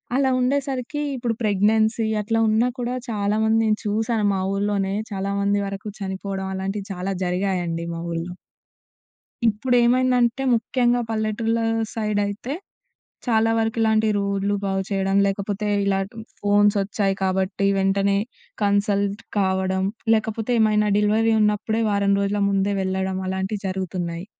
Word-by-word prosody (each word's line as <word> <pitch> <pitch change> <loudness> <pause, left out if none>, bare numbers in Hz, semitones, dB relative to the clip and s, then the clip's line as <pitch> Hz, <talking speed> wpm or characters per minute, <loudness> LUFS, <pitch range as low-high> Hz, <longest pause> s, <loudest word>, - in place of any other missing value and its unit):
అలా 270 -1 +3
ఉండేసరికి 270 +1 -1
ఇప్పుడు 240 -2 -1
ప్రెగ్నెన్సీ 220 +2 +2
అట్లా 225 +2 0
ఉన్నా 220 +3 +3
కూడా, 245 +1 -2
చాలామంది 220 +1 +1
నేను 215 0 +1
చూసాను 220 +1 0
మా - - -1
ఊళ్ళోనే, 200 -1 0 0.2
చాలామంది 200 +1 0
వరకు 195 +2 -6
చనిపోడం 190 0 -4
అలాంటియి 195 +2 -4
చాలా 185 +2 -3
జరిగాయండి 180 -2 -1
మా 165 - -5
ఊళ్ళో. 170 +2 -4 1.1
ఇప్పుడేమైందంటే, 245 +2 +2
ముఖ్యంగా 245 +1 +1
పల్లెటూర్ల 225 +1 0 0.4
సైడయితే, 210 +2 -2 0.7
చాలా 225 -1 +3
వరకు 225 0 -1
ఇలాంటి 220 0 +3
రోడ్లు 200 0 0
బాగుచెయడం, 195 0 0
లేకపోతే 200 +1 -2 0.2
ఇలా 195 -1 +1
ట్ - - -20 0.3
ఫోన్సొచ్చాయి 205 -1 +2
కాబట్టి, 190 +1 0
వెంటనే 195 +1 +2 0.4
కన్సల్ట్ 200 +1 +1 0.2
కావడం, 190 -1 +1 0.3
లేకపోతే 220 +1 -2
ఏమైనా 210 -1 +3
డెలివరీ 220 +2 +3
ఉన్నప్పుడే 210 +2 +1
వారం 200 0 +2
రోజుల 200 +1 0
ముందే 200 +1 +1
వెళ్ళడం 190 0 -1
అలాంటియి 190 +2 -3
జరుగుతున్నాయి 180 -2 -4
205 Hz, 115 wpm, -23 LUFS, 195-220 Hz, 1.1 s, అలా